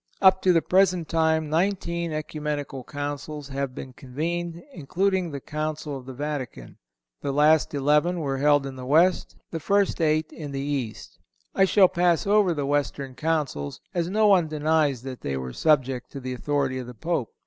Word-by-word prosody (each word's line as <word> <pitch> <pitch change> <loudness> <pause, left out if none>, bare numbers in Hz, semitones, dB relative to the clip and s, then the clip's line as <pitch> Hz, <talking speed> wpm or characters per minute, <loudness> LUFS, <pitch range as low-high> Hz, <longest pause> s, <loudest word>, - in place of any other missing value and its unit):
Up 190 -1 +5
to 185 - +4
the 165 -2 +3
present 185 -3 +3
time 160 -1 +2
nineteen 170 0 -1
Ecumenical 150 -3 -4
Councils 145 0 -5
have 135 -1 -3
been 130 - -8
convened, 170 +7 -4
including 185 +4 0
the 140 -2 -5
Council 155 0 -4
of 130 -1 -9
the 130 - -6
Vatican. 135 - -5 0.4
The 140 - -2
last 150 +2 +3
eleven 150 +5 +2
were 135 -4 -2
held 145 0 +4
in 135 -1 -6
the 130 - -7
West, 170 +6 +3
and - - -29
the 165 - -3
first 200 +2 +1
eight 155 0 +1
in 145 -3 -7
the 135 - -3
East. 135 -5 -4 0.3
I 195 - +4
shall 190 0 +5
pass 175 -2 +1
over 205 -2 +4
the 145 -2 -2
Western 140 -1 -1
Councils, 145 - -2
as 175 -1 -1
no 215 +3 +2
one 190 -5 +5
denies 150 -4 +1
that 130 -2 -7
they 70 -1 -3
were 65 -1 -5
subject 135 -5 +1
to 140 - -5
the 130 -1 -5
authority 135 0 -1
of 125 - -7
the 125 - -9
Pope. 155 -3 -3
150 Hz, 180 wpm, -25 LUFS, 135-170 Hz, 0.4 s, Up